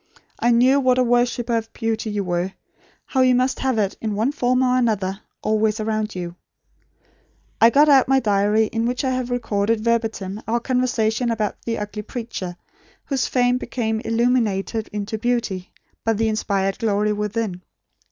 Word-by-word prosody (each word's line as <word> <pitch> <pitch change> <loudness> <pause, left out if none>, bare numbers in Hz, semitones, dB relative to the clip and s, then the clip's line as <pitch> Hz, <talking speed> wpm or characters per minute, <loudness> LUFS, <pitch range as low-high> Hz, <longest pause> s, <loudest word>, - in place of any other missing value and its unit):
I 240 - +2
knew 250 +4 +5
what 255 -2 +3
a 255 - +4
worshipper 240 0 +1
of 225 0 -2
beauty 225 -1 -2
you 205 -1 -2
were; 180 +1 -2 0.5
how 260 - 0
you 255 -1 +5
must 255 +1 +1
have 260 -3 0
it, 200 -3 0
in 215 -2 -2
one 225 +6 +1
form 255 -3 +1
or 250 0 +2
another, 210 -5 0 0.2
always 215 0 +1
around 215 -1 -2
you. 175 -1 -5 1.3
I 230 - +8
got 290 +5 +5
out 275 -3 +6
my 270 0 +4
diary 210 -1 +2
in 225 +1 -1
which 250 +2 -2
I 260 - +1
had 255 -1 -2
recorded 225 -2 0
verbatim 220 -3 -1
our 235 +2 +1
conversation 245 -2 0
about 215 -3 -2
the 230 -1 -1
ugly 210 +1 -5
preacher, 210 -6 -6 0.5
whose 275 -2 0
face 250 0 +2
became 220 -4 -2
illumined 230 -4 +1 0.2
into 210 +1 -3
beauty, 225 -6 -1 0.3
by 225 - +2
the 220 +1 0
inspired 195 -3 -1
glory 210 -1 +1
within. 210 -3 -3
225 Hz, 165 wpm, -22 LUFS, 210-245 Hz, 1.3 s, I